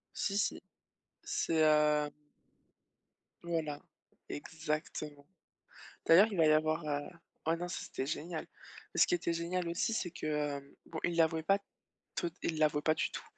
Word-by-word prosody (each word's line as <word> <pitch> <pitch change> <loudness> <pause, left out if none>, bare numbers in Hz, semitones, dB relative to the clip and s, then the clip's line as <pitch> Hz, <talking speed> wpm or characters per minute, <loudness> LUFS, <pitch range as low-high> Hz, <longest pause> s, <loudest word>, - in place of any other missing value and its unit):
Si, 200 0 0
si. - - 0 0.6
C'est, 165 - 0
hem 150 -1 +4 1.3
Voilà, 160 -4 -2 0.5
exactement. 150 -2 -4 0.8
D'ailleurs 185 +7 +8
il 200 - -3
va 160 - +6
y 155 - +6
avoir 155 +1 +2
heu, 145 -1 -1 0.4
ouais, 165 +1 +3
non, 175 +1 -4
ça - - -3
c'était 135 - -4
génial, 160 +2 -3 0.5
et - - -3
ce - - +7
qui - - +2
était 330 - 0
génial 170 +1 -1
aussi 170 +6 0
c'est 195 -5 -1
que, 155 - -6
hem, 145 -2 -2
bon, 160 - -6
ils 175 -1 +1
l'avouaient 160 -1 +3
pas 195 +5 +3 0.6
toute 170 -1 -1
ils 160 - -1
l'avouaient 150 -1 +3
pas 155 - +3
du - - 0
tout, - - -6
160 Hz, 160 wpm, -34 LUFS, 150-170 Hz, 1.3 s, D'ailleurs